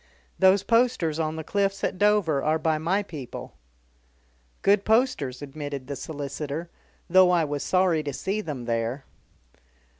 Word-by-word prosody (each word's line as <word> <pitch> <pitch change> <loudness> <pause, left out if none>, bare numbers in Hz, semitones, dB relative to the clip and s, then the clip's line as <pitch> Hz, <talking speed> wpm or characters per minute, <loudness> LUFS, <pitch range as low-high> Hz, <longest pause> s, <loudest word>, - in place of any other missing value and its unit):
Those 190 +1 +5
posters 230 -10 +2
on 155 0 -1
the 160 - -5
Cliffs 195 +3 -1
at - - -1
Dover 205 -9 +3
are 155 +1 +2
by 155 -1 0
my 185 +6 0
people." 145 -10 -8 1.1
"Good 200 0 +4
posters," 215 - +1
admitted 145 -1 -6
the 140 +1 -5
solicitor, 145 +3 -5 0.4
"though 185 +1 +6
I 175 -2 +3
was 145 -2 -3
sorry 185 -4 +2
to 145 - -4
see 195 +11 -2
them 140 - -6
there." 115 +3 -2
160 Hz, 145 wpm, -26 LUFS, 145-195 Hz, 1.1 s, though